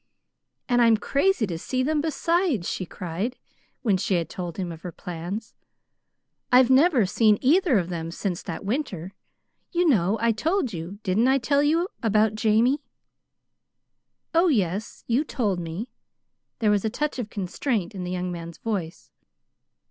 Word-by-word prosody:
"And 245 -1 +3
I'm 230 -2 +5
crazy 280 - +1
to 170 -4 -4
see 255 +8 -1
them, 300 +2 +1
besides," 320 - 0
she 185 - -3
cried, 185 +9 -4 0.5
when 205 -6 +3
she 185 +1 0
had 165 -2 -1
told 175 -3 -5
him 180 -3 -3
of 165 -1 -9
her 180 - -6
plans. 180 +7 -6 1.0
"I've 250 0 +6
never 265 - +5
seen 210 +2 +3
either 305 - +4
of 180 -2 -1
them 165 -2 -4
since 180 +1 -3
that 175 +2 -6
winter. 200 - -3 0.6
You 350 0 +2
know 205 - +3
I 230 0 +3
told 300 - 0
you 170 +4 -6
didn't 210 +5 +2
I 265 +1 +4
tell 280 +2 +2
you? 325 +5 +2
about 215 -1 +3
Jamie." 225 +6 +2 1.5
"Oh, 335 +3 +4
yes, 205 - -1
you 245 +5 +2
told 210 - -1
me." 170 +7 -5 0.7
There 215 -2 +2
was 205 -2 +2
a 220 - +1
touch 290 +4 -2
of 220 -4 -4
constraint 200 +1 -2
in 190 -2 -5
the 180 - -4
young 180 0 -2
man's 170 -1 -7
voice. 190 -7 -4
215 Hz, 160 wpm, -25 LUFS, 180-265 Hz, 1.5 s, I've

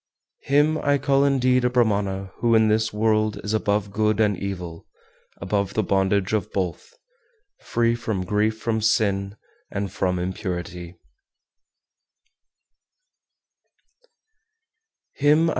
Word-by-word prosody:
412. - - -15
Him 150 +3 +3
I 145 - +4
call 140 0 +2
indeed 130 -2 +2
a 125 - +3
Brahmana 100 -5 0
who 115 0 +2
in 110 -1 +4
this 110 0 +1
world 110 0 +1
is 105 - -2
above 105 -1 0
good 105 +1 +1
and 105 -2 +3
evil, 90 -3 -6 0.5
above 100 +1 -2
the 110 - +1
bondage 95 +1 +1
of 105 -4 -1
both, 90 -4 -4 0.6
free 115 0 0
from 110 -6 -3
grief 105 +3 0
from 110 -1 -1
sin, 100 -2 +1 0.3
and 100 -2 -4
from 90 -1 -1
impurity. 90 -1 -5
105 Hz, 110 wpm, -23 LUFS, 95-110 Hz, 0.6 s, I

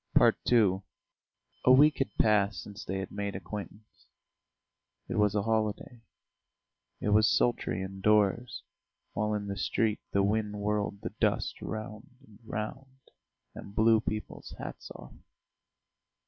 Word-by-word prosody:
II 100 -6 +3 0.8
A 130 - +6
week 145 +4 +6
had 135 - 0
passed 105 -1 +2
since 105 +1 -9
they 95 - -3
had 95 -1 -5
made 100 -1 -4
acquaintance. 105 +2 -9 1.0
It - - -2
was 105 -1 +3
a 105 - +1
holiday. 110 +1 -1 1.0
It - - -1
was 105 +2 +5
sultry 120 -5 +1
indoors, 105 +4 +1 0.5
while 105 +1 0
in 105 -1 -3
the 100 -1 -4
street 110 +2 0
the 100 - +2
wind 105 +1 0
whirled 105 -1 -1
the - - -5
dust - - 0
round 110 +2 -7
and 105 -1 -19
round, 130 +5 -7 0.4
and 100 - -10
blew 110 0 +5
people's 110 -1 -6
hats - - -8
off. - - -11
105 Hz, 130 wpm, -30 LUFS, 100-110 Hz, 1.0 s, A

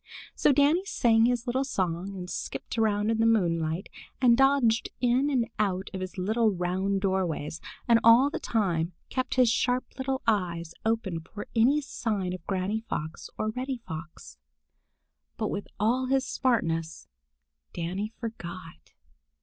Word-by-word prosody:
So - - +3
Danny 290 +6 +4
sang 230 - +3
his 245 0 +1
little 260 +2 0
song 190 -5 -2
and 180 -1 -6
skipped - - -5
about 215 -1 +2
in 225 - 0
the 225 - +4
moonlight, 170 -5 +1 0.3
and 245 -3 +6
dodged 270 -4 +3
in 250 +4 +2
and 250 -5 +1
out 195 -2 0
of 190 - -4
his 185 +1 -6
little 220 +5 +2
round 190 +1 -1
doorways, 180 -5 -1 0.3
and 230 -1 +6
all 240 +5 +7
the - - -3
time 180 -6 0 0.2
kept 255 -1 -2
his 255 -1 +5
sharp 250 +1 +1
little 265 0 -2
eyes 170 -6 0
open 220 -6 -1
for 205 +6 -9
any 260 +7 +4
sign 205 -9 -2
of 185 -3 -7
Granny 195 +3 -1
Fox 160 -8 -5
or 215 - -1
Reddy 255 +3 -3
Fox. 160 0 -9 1.0
But 215 -2 -1
with 200 - -4
all 245 +5 +2
his 265 0 +2
smartness, 165 -10 -1 0.6
Danny 185 +5 -3
forgot. 175 - -8
215 Hz, 150 wpm, -28 LUFS, 180-245 Hz, 1.0 s, all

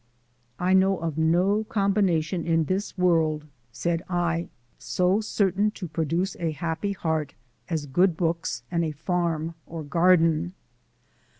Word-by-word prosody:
"I 180 +1 +1
know 190 0 +4
of 160 -2 -3
no 180 +7 +3
combination 190 -5 +1
in 165 -1 +2
this 190 +5 -2
world," 160 -4 +2 0.3
said 170 +7 -1
I, 170 -1 0 0.3
"so 185 +4 +1
certain 205 -1 +1
to 180 - -5
produce 165 +4 -1
a 165 -2 -1
happy 165 +5 -2
heart 160 -5 -2 0.3
as 160 -4 -1
good 175 +5 +2
books 165 -8 -1
and 170 -1 +1
a 155 -2 -2
farm 165 0 -1
or 165 -1 -6
garden." 165 +2 +3
170 Hz, 130 wpm, -26 LUFS, 160-185 Hz, 0.3 s, know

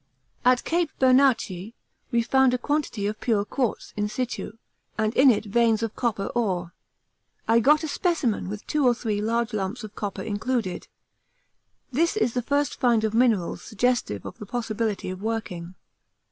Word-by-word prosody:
At 250 0 +4
Cape 340 -1 0
Bernacchi 255 -6 +3 0.3
we 235 -2 +2
found 265 +1 +3
a - - 0
quantity 275 -6 -1
of 210 +1 -3
pure 215 -4 +1
quartz 245 +1 -2
in 210 0 0
situ, 245 -2 -4 0.4
and 215 0 +1
in 270 +1 +7
it 225 -2 +2
veins 225 +1 +2
of 225 - -3
copper 225 -5 -1
ore. 180 -7 -1 0.7
I 230 +1 +5
got 300 +6 +4
a - - -1
specimen 290 - 0
with 210 +1 -6
two 300 -1 0
or 245 -2 +4
three 215 -3 -2
large 230 +2 0
lumps 210 +4 -3
of 215 -1 -8
copper 200 -3 -4
included. 220 -2 -2 1.0
This 335 - +1
is 250 - +1
the 245 - 0
first 285 +2 0
find 235 -3 +3
of 220 -1 0
minerals 225 -7 +2
suggestive 230 - -1
of - - -8
the 210 - -8
possibility 220 -4 -2
of 185 +1 -7
working. 190 -6 -4
230 Hz, 165 wpm, -25 LUFS, 210-255 Hz, 1.0 s, in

